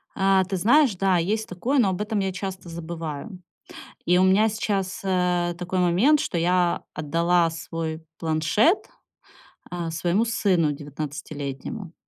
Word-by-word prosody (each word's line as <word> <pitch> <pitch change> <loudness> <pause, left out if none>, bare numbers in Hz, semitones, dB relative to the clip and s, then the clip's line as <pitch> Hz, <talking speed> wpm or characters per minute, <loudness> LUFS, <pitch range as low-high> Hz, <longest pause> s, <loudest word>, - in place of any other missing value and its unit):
А, 195 0 +3
ты 190 +1 -3
знаешь, 240 - +4
да, 190 0 +2
есть 215 +6 -1
такое, 245 +10 -1
но 215 -6 +4
об 185 +1 -3
этом 210 0 -1
я 195 -1 -1
часто 185 -1 -6
забываю. 165 +2 -6 0.7
И 180 +1 +3
у 185 - +4
меня 195 +4 +4
сейчас, 200 -3 -2
э, 180 -2 +1
такой 180 +1 -3
момент, 190 - +4
что 180 - -2
я 175 +1 +1
отдала 170 +3 +1
свой 160 0 -5
планшет, 165 - +2 0.8
э, 175 -2 -3
своему 175 +7 +1
сыну 185 -8 +1
девятнадцатилетнему. 145 - -6
180 Hz, 140 wpm, -24 LUFS, 165-195 Hz, 0.8 s, знаешь